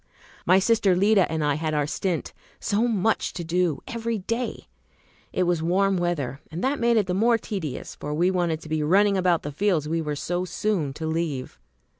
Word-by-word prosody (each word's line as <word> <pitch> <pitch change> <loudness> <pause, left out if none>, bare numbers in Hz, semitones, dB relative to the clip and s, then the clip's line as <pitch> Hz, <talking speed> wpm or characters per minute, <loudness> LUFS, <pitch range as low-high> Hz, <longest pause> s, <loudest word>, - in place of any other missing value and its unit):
My 185 +2 +6
sister 195 -2 +3
Lida 200 0 +3
and 160 -1 -1
I 145 -1 +2
had 155 +1 -2
our 150 -1 +1
"stint," 170 +2 -2 0.3
so 215 +4 +1
much 220 -1 0
to 175 - -5
do 170 -2 0
every 230 -1 -2
day. 230 +5 -3 0.7
It 185 - +1
was 175 -2 +1
warm 190 +4 +2
weather, 165 -7 -1
and 165 +3 -5
that 275 +3 +1
made 235 0 +3
it 210 - +3
the 180 - -2
more 230 +5 +3
tedious, 190 - -5
for 150 - -5
we 175 +5 +2
wanted 170 -4 0
to 155 - -11
be 155 0 0
running 195 +6 +4
about 180 -3 +2
the 145 - -4
fields 165 -1 +1
we 165 +1 0
were 150 -2 -3
so 175 +5 -2
soon 180 -4 -1
to 160 +3 -6
leave. 160 -5 -3
180 Hz, 200 wpm, -25 LUFS, 155-205 Hz, 0.7 s, My